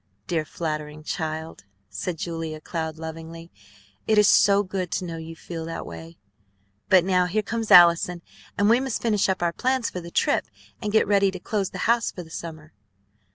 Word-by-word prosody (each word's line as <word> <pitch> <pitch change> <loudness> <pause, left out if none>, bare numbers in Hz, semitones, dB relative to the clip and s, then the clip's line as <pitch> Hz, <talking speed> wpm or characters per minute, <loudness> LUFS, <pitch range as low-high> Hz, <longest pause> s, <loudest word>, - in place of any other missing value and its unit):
"Dear, 160 -3 -1
flattering 155 -2 -5
child!" 160 - -5 0.2
said 110 - -4
Julia 165 -2 -4
Cloud 160 -1 -4
lovingly. 165 +1 -8 0.6
"It 220 - +3
is 210 -1 +6
so 200 -1 +5
good 185 -2 -4
to 185 - -2
know 165 -1 -5
you 165 0 -8
feel 165 0 -7
that 165 0 -5
way! 80 0 -10 0.7
But 185 -2 +6
now 180 -1 +2
here 215 +4 0
comes 225 0 -3
Allison, 170 0 +6 0.3
and 205 - +3
we 230 +3 +5
must 265 -3 -3
finish 210 -4 +2
up 190 -2 0
our 170 -1 +1
plans 260 +2 0
for 180 - -5
the 170 - -9
trip - - +1 0.3
and 210 - -2
get 220 - +4
ready 200 -1 +3
to 185 -1 -6
close 200 0 -2
the - - -8
house 235 +1 +2
for 180 - -8
the 160 - -16
summer." 155 -2 -8
170 Hz, 190 wpm, -24 LUFS, 160-200 Hz, 0.7 s, is